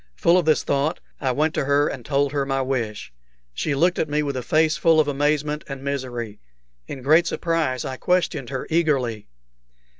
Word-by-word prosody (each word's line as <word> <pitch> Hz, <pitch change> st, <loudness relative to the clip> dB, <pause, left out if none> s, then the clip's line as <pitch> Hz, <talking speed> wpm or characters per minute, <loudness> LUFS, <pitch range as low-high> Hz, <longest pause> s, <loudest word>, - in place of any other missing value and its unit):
Full 170 Hz, -, +3 dB
of 180 Hz, -3 st, +2 dB
this 155 Hz, -1 st, +3 dB
thought, 140 Hz, +3 st, 0 dB, 0.2 s
I 135 Hz, -3 st, 0 dB
went 150 Hz, +5 st, 0 dB
to -, -, -1 dB
her 145 Hz, +1 st, +3 dB
and 125 Hz, -, -5 dB
told 140 Hz, +1 st, 0 dB
her 145 Hz, -1 st, 0 dB
my 135 Hz, -1 st, -1 dB
wish. 115 Hz, -, -3 dB, 0.4 s
She 145 Hz, -, -1 dB
looked 175 Hz, +5 st, +2 dB
at 155 Hz, -, 0 dB
me 150 Hz, +1 st, 0 dB
with 140 Hz, -2 st, -3 dB
a 130 Hz, -, -2 dB
face 155 Hz, +5 st, +2 dB
full 160 Hz, +1 st, +3 dB
of 155 Hz, -, +3 dB
amazement 150 Hz, +1 st, 0 dB
and 135 Hz, -1 st, -7 dB
misery. 125 Hz, -6 st, -4 dB, 0.5 s
In 135 Hz, -3 st, -7 dB
great 155 Hz, +5 st, +4 dB
surprise 160 Hz, -7 st, -1 dB
I 130 Hz, -, -5 dB
questioned 175 Hz, -7 st, 0 dB
her 130 Hz, -1 st, -4 dB
eagerly. 135 Hz, -, 0 dB
140 Hz, 190 wpm, -23 LUFS, 130-155 Hz, 0.5 s, great